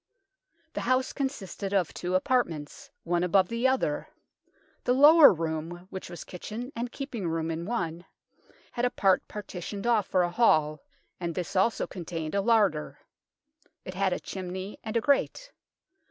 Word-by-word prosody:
The -, -, -3 dB
house 255 Hz, +1 st, +1 dB
consisted 210 Hz, -8 st, -4 dB
of 185 Hz, -5 st, +1 dB
two 180 Hz, +1 st, -2 dB
apartments, 245 Hz, -, -1 dB
one 175 Hz, +1 st, 0 dB
above 185 Hz, 0 st, +3 dB
the 230 Hz, +2 st, +1 dB
other. 260 Hz, -, 0 dB, 0.8 s
The 250 Hz, -, +2 dB
lower 300 Hz, +3 st, +9 dB
room, 165 Hz, +1 st, -4 dB
which 190 Hz, -, -7 dB
was 175 Hz, -, -8 dB
kitchen 220 Hz, +8 st, -7 dB
and 235 Hz, +1 st, -3 dB
keeping 245 Hz, -9 st, -5 dB
room 165 Hz, 0 st, -1 dB
in 165 Hz, +2 st, -4 dB
one, 175 Hz, -7 st, -3 dB, 0.7 s
had 240 Hz, -, -3 dB
a 250 Hz, -, +4 dB
part 195 Hz, -5 st, +2 dB
partitioned 200 Hz, 0 st, -6 dB
off 225 Hz, -5 st, +2 dB
for 185 Hz, -1 st, +2 dB
a 175 Hz, -, -1 dB
hall, 155 Hz, -9 st, +3 dB, 0.4 s
and 170 Hz, -2 st, -3 dB
this 180 Hz, 0 st, -4 dB
also 190 Hz, +5 st, +2 dB
contained 165 Hz, -3 st, -5 dB
a 200 Hz, -, +2 dB
larder. 205 Hz, -8 st, +2 dB, 0.9 s
It 185 Hz, -, -6 dB
had 190 Hz, 0 st, +1 dB
a 180 Hz, -, -1 dB
chimney 185 Hz, +1 st, -6 dB
and 220 Hz, +1 st, -2 dB
a -, -, +1 dB
grate. 395 Hz, -, +1 dB
190 Hz, 155 wpm, -28 LUFS, 175-235 Hz, 0.9 s, lower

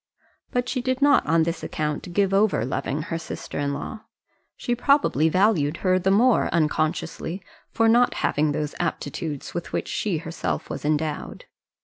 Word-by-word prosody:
But 245 Hz, 0 st, -1 dB
she 255 Hz, 0 st, -1 dB
did 260 Hz, +1 st, -1 dB
not 285 Hz, 0 st, +5 dB
on 165 Hz, +1 st, +4 dB
this 165 Hz, 0 st, -2 dB
account 150 Hz, +3 st, -3 dB
give 195 Hz, +1 st, +1 dB
over 195 Hz, -, +3 dB
loving 140 Hz, +3 st, -2 dB
her 165 Hz, 0 st, -3 dB
sister 165 Hz, -, -6 dB
in 140 Hz, 0 st, 0 dB
law. 145 Hz, +9 st, -5 dB, 0.6 s
She 240 Hz, -, -1 dB
probably 240 Hz, -, +3 dB
valued 175 Hz, -5 st, +2 dB
her 185 Hz, 0 st, +4 dB
the 185 Hz, +1 st, +1 dB
more, 230 Hz, +5 st, +4 dB
unconsciously, 160 Hz, +2 st, -1 dB, 0.3 s
for 225 Hz, -, +2 dB
not 240 Hz, +2 st, +4 dB
having 150 Hz, +1 st, +1 dB
those 150 Hz, 0 st, -2 dB
aptitudes 145 Hz, 0 st, -3 dB
with 175 Hz, -, -5 dB
which -, -, -1 dB
she 195 Hz, -6 st, -1 dB
herself 150 Hz, -, -4 dB
was -, -, -5 dB
endowed. 150 Hz, 0 st, -2 dB
165 Hz, 160 wpm, -24 LUFS, 150-215 Hz, 0.6 s, not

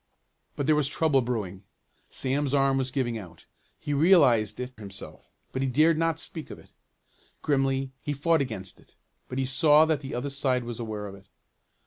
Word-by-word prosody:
But 140 Hz, -, -2 dB
there 155 Hz, -, +4 dB
was 150 Hz, -2 st, +2 dB
trouble 150 Hz, -3 st, +2 dB
brewing. 105 Hz, -6 st, -3 dB, 0.5 s
Sam's 140 Hz, +1 st, 0 dB
arm 135 Hz, -1 st, +3 dB
was 130 Hz, -1 st, -1 dB
giving 125 Hz, -4 st, -1 dB
out. 85 Hz, -5 st, -13 dB, 0.3 s
He 145 Hz, -, -3 dB
realized 140 Hz, -, +4 dB
it 125 Hz, +1 st, -5 dB
himself 100 Hz, -3 st, -10 dB, 0.2 s
but 130 Hz, -, -3 dB
he 135 Hz, -, +1 dB
dared 155 Hz, +6 st, +4 dB
not 165 Hz, 0 st, +1 dB
speak 160 Hz, -2 st, -7 dB
of -, -, -8 dB
it. -, -, -18 dB, 0.7 s
Grimly 135 Hz, -2 st, +1 dB
he 145 Hz, -, -3 dB
fought 160 Hz, +3 st, +2 dB
against 105 Hz, -8 st, -4 dB
it, -, -, -24 dB, 0.3 s
but 125 Hz, -, -5 dB
he 135 Hz, -, +1 dB
saw 150 Hz, +3 st, +5 dB
that 160 Hz, -3 st, +1 dB
the 135 Hz, -3 st, -6 dB
other 135 Hz, +3 st, -3 dB
side 130 Hz, -3 st, 0 dB
was 120 Hz, -1 st, -6 dB
aware 110 Hz, -3 st, -4 dB
of 100 Hz, -, -7 dB
it. 100 Hz, 0 st, -15 dB
135 Hz, 185 wpm, -27 LUFS, 120-145 Hz, 0.7 s, saw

